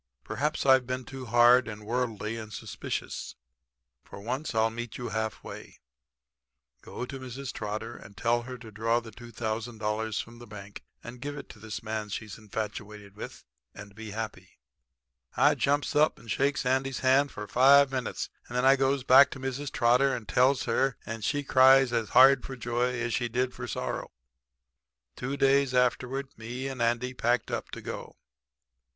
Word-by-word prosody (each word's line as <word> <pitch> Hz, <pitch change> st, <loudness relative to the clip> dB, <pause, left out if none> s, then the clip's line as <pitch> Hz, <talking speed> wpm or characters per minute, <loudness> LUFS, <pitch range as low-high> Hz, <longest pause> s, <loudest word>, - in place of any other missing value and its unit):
Perhaps 150 Hz, -, -2 dB
I've 130 Hz, -2 st, +5 dB
been 130 Hz, 0 st, -3 dB
too 130 Hz, -1 st, -8 dB
hard 120 Hz, +1 st, +6 dB
and 105 Hz, -1 st, -8 dB
worldly 115 Hz, -2 st, -2 dB
and 110 Hz, -1 st, -7 dB
suspicious. 95 Hz, -, -5 dB, 0.7 s
For -, -, -11 dB
once 125 Hz, +6 st, -4 dB
I'll 110 Hz, 0 st, +3 dB
meet 120 Hz, 0 st, -6 dB
you 120 Hz, -, -5 dB
half 110 Hz, +1 st, -3 dB
way. -, -, -10 dB, 1.0 s
Go 125 Hz, -, -6 dB
to 135 Hz, +1 st, -7 dB
Mrs. 130 Hz, +1 st, -6 dB
Trotter 110 Hz, +2 st, -5 dB
and 100 Hz, 0 st, -14 dB
tell 120 Hz, 0 st, +1 dB
her 125 Hz, +1 st, -8 dB
to 115 Hz, -2 st, -12 dB
draw 115 Hz, +3 st, +1 dB
the 115 Hz, -1 st, -11 dB
$2,000 110 Hz, -1 st, -3 dB
from 115 Hz, +1 st, -14 dB
the 120 Hz, -, -11 dB
bank 100 Hz, -1 st, -10 dB, 0.2 s
and 120 Hz, +1 st, -9 dB
give 145 Hz, +1 st, -5 dB
it 140 Hz, -, -9 dB
to 110 Hz, -, -12 dB
this 110 Hz, 0 st, -6 dB
man 110 Hz, -1 st, -3 dB
she's 105 Hz, +1 st, -6 dB
infatuated 105 Hz, -1 st, -6 dB
with 105 Hz, -, -8 dB, 0.3 s
and 100 Hz, 0 st, -10 dB
be 110 Hz, +1 st, -8 dB
happy.' 100 Hz, -4 st, -6 dB, 0.8 s
"I -, -, +5 dB
jumps 145 Hz, +1 st, 0 dB
up 150 Hz, +1 st, +4 dB
and 115 Hz, -, -9 dB
shakes 140 Hz, +3 st, +1 dB
Andy's 130 Hz, +1 st, 0 dB
hand 135 Hz, +2 st, +4 dB
for 105 Hz, 0 st, -7 dB
five 140 Hz, +3 st, +6 dB
minutes, 130 Hz, -2 st, -3 dB, 0.2 s
and 120 Hz, -, -4 dB
then 125 Hz, -, +2 dB
I 135 Hz, +1 st, +7 dB
goes 135 Hz, 0 st, +1 dB
back 135 Hz, +2 st, +7 dB
to -, -, -8 dB
Mrs. 135 Hz, +1 st, -4 dB
Trotter 125 Hz, +3 st, +3 dB
and 115 Hz, -4 st, -7 dB
tells 130 Hz, +5 st, +3 dB
her, 130 Hz, +3 st, +1 dB
and 115 Hz, -1 st, -6 dB
she 145 Hz, +5 st, 0 dB
cries 130 Hz, -1 st, +6 dB
as 115 Hz, -4 st, 0 dB
hard 135 Hz, 0 st, +8 dB
for 135 Hz, -, -6 dB
joy 120 Hz, +1 st, -1 dB
as 120 Hz, 0 st, -1 dB
she 120 Hz, -1 st, 0 dB
did 125 Hz, +2 st, -1 dB
for -, -, -6 dB
sorrow. -, -, -4 dB, 1.1 s
"Two 135 Hz, +3 st, -4 dB
days 135 Hz, -1 st, +3 dB
afterward 130 Hz, +2 st, +1 dB
me 120 Hz, +4 st, -5 dB
and 135 Hz, -2 st, -5 dB
Andy 120 Hz, +2 st, 0 dB
packed 120 Hz, 0 st, 0 dB
up -, -, -3 dB
to -, -, -8 dB
go. -, -, -7 dB
120 Hz, 175 wpm, -28 LUFS, 110-130 Hz, 1.1 s, hard